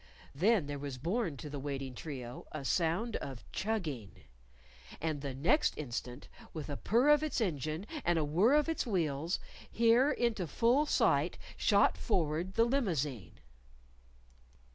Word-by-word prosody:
Then 190 +4 +3
there 145 0 -5
was 140 -2 -5
borne 175 - -1
to 150 - -7
the 145 -1 -5
waiting 135 -2 -4
trio 125 -3 -7
a 145 -3 -6
sound 175 - 0
of 135 -3 -7
chugging. 160 - -3 0.8
And 155 -2 -2
the 140 -2 -4
next 170 - +2
instant, 125 -2 -5 0.3
with 155 -2 -6
a - - -2
purr 240 - +2
of 295 0 +6
its 310 -4 -1
engine, 155 - -2 0.2
and 175 -1 +2
a 155 - +1
whirr 185 - +4
of 300 0 +3
its 325 -5 -1
wheels, 165 -4 0 0.3
here 235 +4 +4
into 220 -7 0
full 245 - +2
sight - - +2 0.2
shot - - +3
forward 175 -2 0
the 230 - +5
limousine! 160 - -2
165 Hz, 145 wpm, -33 LUFS, 140-230 Hz, 0.8 s, of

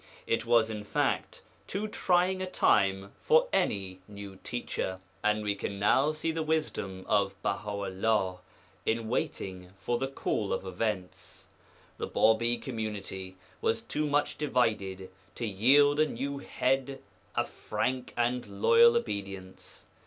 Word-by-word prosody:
It 115 0 0
was, 115 -2 +4
in 105 -1 -5
fact, 105 - -1 0.2
too 205 +2 -2
trying 185 -2 +2
a 185 - -3
time 100 - +2
for 480 +2 +4
any 95 -2 0
new 100 -2 -9
teacher, 95 -5 -3 0.2
and 105 0 +2
we 105 -1 +1
can 100 0 -4
now 130 +9 +4
see 155 +1 -2
the 160 0 -2
wisdom 150 -12 -2
of 100 -2 +1
Baha 105 +2 -1
'ullah 100 -1 0 0.4
in 110 0 -1
waiting 95 -5 -3
for 120 +7 -1
the 135 - 0
call 110 -6 -2
of - - -3
events. 95 0 -4 0.5
The - - -2
Bābī 115 +2 +3
community 100 -6 -5 0.3
was 115 0 +1
too 150 0 -1
much 145 0 0
divided 110 -10 0 0.2
to 120 - -3
yield 140 +8 +4
a 155 - +5
new 140 +2 -4
Head 135 0 -1 0.3
a - - +2
frank 130 0 -3
and 120 +1 +1 0.2
loyal 235 - +7
obedience. 95 - -6
110 Hz, 140 wpm, -30 LUFS, 100-135 Hz, 0.5 s, loyal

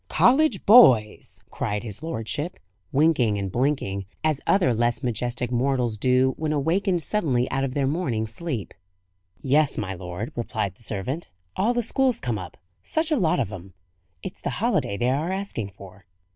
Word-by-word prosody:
"College 260 -4 +3
boys!" 130 - +5
cried 105 +1 -3
his 110 +1 -7
lordship, 150 - -4 0.3
winking 135 -8 +3
and 100 -2 -3
blinking, 110 -6 -1 0.2
as 155 -3 +1
other 180 -11 +3
less 120 +3 0
majestic 125 +1 -2
mortals 125 -2 0
do 130 +4 +2
when 155 -1 -2
awakened 170 +4 0
suddenly 140 - 0
out 135 - 0
of 130 -2 -3
their 140 -2 +1
morning 135 -7 -1
sleep. 115 - -5 0.7
"Yes, 145 +2 +2
my 95 -2 -3
lord," 90 +4 -6
replied 110 -5 -2
the 95 - -20
servant. 115 - -4 0.3
"All 230 +5 +1
the 240 - +1
school's 255 +1 +2
come 115 -4 -2
up; 90 -2 -9 0.2
such 320 +1 -1
a - - +4
lot 170 - +1
of 115 -6 -1
'em! 95 -1 -10 0.5
It's - - -7
the - - -2
holiday 100 - 0
they 120 +3 +1
are 155 +7 -1
asking 190 - -3
for." 95 -1 -15
130 Hz, 165 wpm, -24 LUFS, 110-160 Hz, 0.7 s, boys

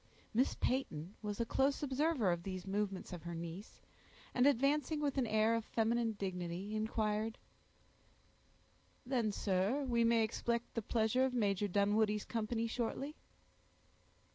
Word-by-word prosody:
Miss 250 +5 +2
Peyton 190 - -1
was 210 -1 -4
a 235 - +1
close 275 +5 +1
observer 275 - +2
of 175 -1 -1
these 185 0 -5
movements 195 -1 -2
of 175 - -6
her 170 0 -5
niece, 170 +5 -7 0.5
and 250 +2 +4
advancing 285 +3 +2
with 290 -2 0
an 245 - +1
air 220 +1 +3
of 230 -1 0
feminine 225 +1 +1
dignity, 185 0 -4
inquired,— 215 +1 -1 1.7
"Then, 240 -4 +1
sir, 200 +8 +1
we 235 -2 +2
may 230 -1 +4
expect 235 +2 -1
the 230 - -1
pleasure 220 +3 +2
of 260 -1 +1
Major 205 -3 +1
Dunwoodie's 210 +2 +2
company 225 0 -1
shortly?" 245 +5 -2
220 Hz, 140 wpm, -36 LUFS, 200-245 Hz, 1.7 s, and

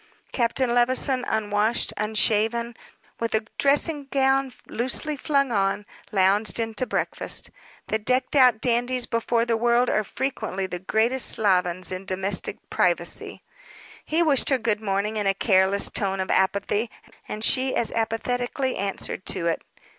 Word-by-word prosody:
Captain 240 0 0
Levison, 255 +1 +1
unwashed, 215 +1 0
unshaven, 220 +2 0 0.4
with 230 -1 -1
a 220 0 0
dressing 290 +1 +2
gown 270 0 +2 0.2
loosely 260 +5 -1
flung 275 -2 0
on, 200 -1 0 0.3
lounged 200 +3 +2
in 225 -1 -2
to 255 +3 -2
breakfast. - - -2 0.3
The 220 - -1
decked 255 +5 0
out 250 -5 +5
dandies 245 +1 +1
before 230 0 0
the 235 -1 +1
world 240 +2 +2
are 215 - +1
frequently 220 -5 -3
the 180 -1 -5
greatest 225 +7 +1
slovens 185 -3 +1
in 185 +1 -5
domestic 190 +1 -1
privacy. - - 0 0.6
He 325 +2 +1
wished 290 -5 +3
her 270 - +3
good 220 -3 -1
morning 205 +1 -1
in 205 -2 0
a 195 - +2
careless 195 0 +3
tone 195 -2 -1
of 190 - -2
apathy, 200 +4 +1 0.4
and 215 +1 -5
she 260 +2 +2
as 230 - 0
apathetically 245 +4 -2
answered 195 -1 -3
to 180 -3 0
it. 170 - 0
225 Hz, 145 wpm, -24 LUFS, 200-255 Hz, 0.6 s, out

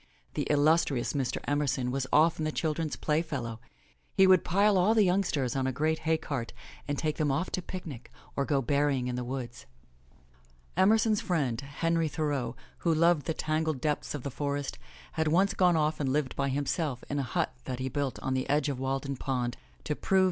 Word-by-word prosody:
The - - -2
illustrious 145 -3 +3
Mr. 135 -4 -1
Emerson 140 -3 0
was 135 0 -2
often 160 +1 +4
the 155 - 0
children's 155 -1 -1
playfellow. 140 -8 -2 0.6
He 190 - +6
would 185 -2 +6
pile 200 +3 +3
all 190 +5 +4
the 215 - +6
youngsters 180 -9 +1
on 130 -1 0
a - - +1
great 155 +5 0
hay 160 - +4
cart 130 -7 -4 0.3
and 145 0 -1
take 155 0 -1
them 150 -2 +1
off 140 +7 -1
to 185 - -1
picnic 165 -10 -8 0.2
or 140 - +1
go 140 -1 +1
berrying 140 0 +1
in - - -2
the 125 - -2
woods. 125 - -6 1.1
Emerson's 210 +3 +4
friend, 140 -9 0
Henry 165 +4 0
Thoreau, 145 -5 -2 0.2
who 170 - +1
loved 165 -2 +3
the 160 - 0
tangled 155 -2 -1
depths 150 +2 -1
of 140 - -6
the 140 - -4
forests, 140 0 -3 0.3
had 160 -1 0
once 190 +5 +3
gone 180 -3 +4
off 155 0 +1
and 135 -3 0
lived 145 -2 0
by 140 0 0
himself 140 0 -1
in 145 - -2
a 130 -3 -4
hut - - +1
that 130 -1 -3
he 130 +1 -3
built 135 0 -2
on 130 - 0
the 130 0 -1
edge 145 0 +2
of 135 -3 -3
Walden 135 +1 -2
Pond, 125 -3 -2 0.3
to 150 - -2
prove. 190 +5 +2
145 Hz, 195 wpm, -29 LUFS, 135-160 Hz, 1.1 s, He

